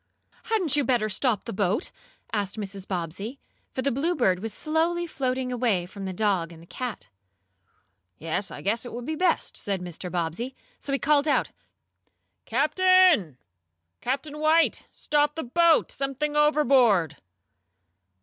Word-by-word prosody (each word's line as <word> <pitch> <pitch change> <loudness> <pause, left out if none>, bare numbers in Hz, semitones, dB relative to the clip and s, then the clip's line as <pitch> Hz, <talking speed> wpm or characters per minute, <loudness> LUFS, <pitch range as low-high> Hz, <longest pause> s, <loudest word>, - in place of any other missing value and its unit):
"Hadn't 380 -10 +1
you 290 - +2
better 235 -4 +1
stop 215 +1 0
the 230 - -6
boat?" 200 - 0 0.4
asked 205 -1 -2
Mrs. 195 -2 -6
Bobbsey, 195 - -4 0.3
for 260 - -3
the 275 - +1
Bluebird 270 - +1
was 220 +3 -5
slowly 330 +5 0
floating 260 -4 -2
away 230 -8 +1
from 195 +2 -8
the 190 - -3
dog 185 -4 0
and 165 - -12
the 165 - -14
cat. 225 - -6 1.1
"Yes, 165 +5 -3
I - - -8
guess 220 +4 0
it 245 - -8
would 240 +1 -6
be 315 - -2
best," 355 +1 0
said 195 -2 -2
Mr. 180 0 -6
Bobbsey. 180 - -3 0.2
So 280 - -6
he 275 - +2
called 290 +1 +2
out: 295 - +1 0.9
"Captain! 310 - +4 0.6
Captain 285 +4 -3
White! 315 +2 +3
Stop 295 0 0
the 320 - -3
boat! 335 +6 +3
Something 275 +2 -2
overboard!" 260 - +4
250 Hz, 145 wpm, -26 LUFS, 195-300 Hz, 1.1 s, Captain